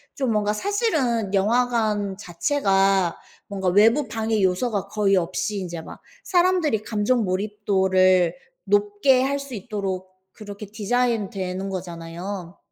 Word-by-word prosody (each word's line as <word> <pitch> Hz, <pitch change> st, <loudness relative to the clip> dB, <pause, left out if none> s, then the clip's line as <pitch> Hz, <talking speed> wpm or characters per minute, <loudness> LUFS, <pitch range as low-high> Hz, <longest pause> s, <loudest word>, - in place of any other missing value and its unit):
좀 260 Hz, -4 st, -1 dB
뭔가 210 Hz, -1 st, +1 dB
사실은 260 Hz, -, 0 dB
영화관 210 Hz, -2 st, +1 dB
자체가 195 Hz, -3 st, +1 dB, 0.3 s
뭔가 195 Hz, -2 st, -3 dB
외부 225 Hz, +10 st, +4 dB
방해 220 Hz, -1 st, -1 dB
요소가 195 Hz, +2 st, 0 dB
거의 200 Hz, -2 st, +2 dB
없이 185 Hz, +4 st, -2 dB
인제 170 Hz, -3 st, -5 dB
막 -, -, -11 dB, 0.2 s
사람들이 350 Hz, -, +2 dB
감정 220 Hz, +2 st, +1 dB
몰입도를 185 Hz, -2 st, +2 dB, 0.3 s
높게 205 Hz, +6 st, +3 dB
할 280 Hz, +1 st, 0 dB
수 275 Hz, -2 st, -8 dB
있도록 190 Hz, -3 st, -4 dB, 0.2 s
그렇게 205 Hz, -1 st, -9 dB
디자인되는 200 Hz, -4 st, -1 dB
거잖아요. 175 Hz, 0 st, -6 dB
205 Hz, 270 characters per minute, -23 LUFS, 190-230 Hz, 0.3 s, 외부